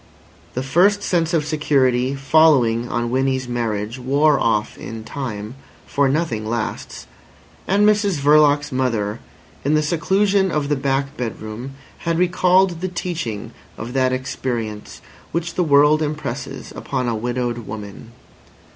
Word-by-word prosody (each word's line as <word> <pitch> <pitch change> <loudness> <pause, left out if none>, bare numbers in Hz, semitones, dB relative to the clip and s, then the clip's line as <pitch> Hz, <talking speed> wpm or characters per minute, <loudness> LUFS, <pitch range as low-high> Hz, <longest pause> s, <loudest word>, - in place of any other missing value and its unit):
The 130 - -1
first 190 +9 +3
sense 165 -2 +1
of 160 -3 +1
security 135 -4 +1
following 135 -5 +3
on 120 0 -1
Winnie's 130 0 0
marriage 115 -1 -3
wore 140 +3 +3
off 105 -2 0
in 115 -1 -8
time 110 -4 -5 0.3
(for 140 -1 +1
nothing 140 -7 -1
lasts), 110 - -4 0.6
and 200 +2 +3
Mrs 205 -4 +2
Verloc's 145 0 +4
mother, 115 -5 -1 0.4
in 145 +3 +2
the 155 - +2
seclusion 190 +5 +2
of 150 -4 -1
the 145 - +2
back 135 +1 -1
bedroom, 115 +2 -5 0.3
had 165 0 -1
recalled 180 0 +3
the 185 - -1
teaching 170 - -4 0.3
of 115 +3 -6
that 130 -1 +2
experience 120 -4 -4 0.3
which 170 +1 -2
the 180 - +1
world 150 0 +5
impresses 145 -4 -4
upon 130 -2 -3
a 120 - 0
widowed 120 0 -3
woman. 105 +1 -8
135 Hz, 135 wpm, -20 LUFS, 120-155 Hz, 0.6 s, world